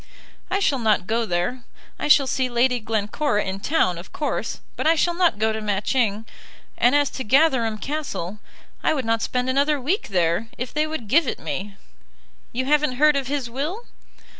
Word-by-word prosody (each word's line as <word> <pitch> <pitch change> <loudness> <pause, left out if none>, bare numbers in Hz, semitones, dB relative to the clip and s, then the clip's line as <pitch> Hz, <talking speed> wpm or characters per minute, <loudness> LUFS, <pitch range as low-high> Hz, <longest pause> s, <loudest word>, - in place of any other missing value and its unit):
"I 375 - +1
shall 290 -9 +1
not 215 -5 +2
go 225 +2 0
there. 180 +9 -1 0.4
I - - -1
shall 290 -2 +6
see 260 -1 0
Lady 245 +1 +2
Glencora 215 +2 -1
in 190 +1 -4
town, 195 - +1
of 175 - -12
course; 300 - -3 0.2
but - - -1
I 325 - +5
shall 345 +2 +2
not 345 - +2
go 220 +1 +1
to 220 - -4
Matching; 215 +1 0 0.5
and 245 +3 +3
as 290 -1 +2
to 260 - -5
Gatherum 255 -3 +3
Castle, 215 - -4 0.4
I 315 - +2
would 265 -4 -2
not 225 0 +1
spend 250 0 -1
another 280 +3 +2
week 325 - -1
there, 175 +3 +1
if 250 +1 -5
they 305 +1 +1
would 310 -8 -5
give 295 +7 +3
it - - -2
me. 200 +2 -5 0.8
You 260 +2 -2
haven't 300 -1 +2
heard 300 +3 +4
of 275 -2 -1
his 275 -2 -2
will?" 305 - -4
255 Hz, 190 wpm, -23 LUFS, 215-295 Hz, 0.8 s, shall